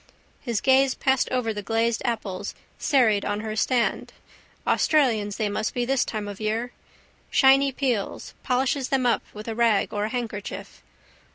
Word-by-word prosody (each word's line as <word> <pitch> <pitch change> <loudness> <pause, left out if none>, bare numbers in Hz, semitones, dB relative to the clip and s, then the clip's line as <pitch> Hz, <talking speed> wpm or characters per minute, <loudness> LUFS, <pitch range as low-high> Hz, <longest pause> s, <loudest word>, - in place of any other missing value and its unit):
His 235 -6 -2
gaze 265 0 +4
passed 265 -2 +1
over 250 -3 -1
the 210 - -5
glazed 225 +2 0
apples 215 -6 -3 0.2
serried 225 -8 +3
on 205 0 -2
her 215 -1 -4
stand. 240 +2 0 0.5
Australians 225 -10 +2
they 215 - 0
must 210 +1 -2
be 245 -1 0
this 270 +1 +2
time 215 -2 -4
of 205 +1 -8
year. 225 +3 -1 0.6
Shiny 275 +1 +5
peels: 250 -6 -2
polishes 260 +1 0
them 265 -2 +1
up 240 - +2
with 210 +1 -9
a 225 - -2
rag 230 -3 +2
or 205 0 -1
a - - -3
handkerchief. 225 -4 -5
235 Hz, 160 wpm, -25 LUFS, 215-260 Hz, 0.6 s, Shiny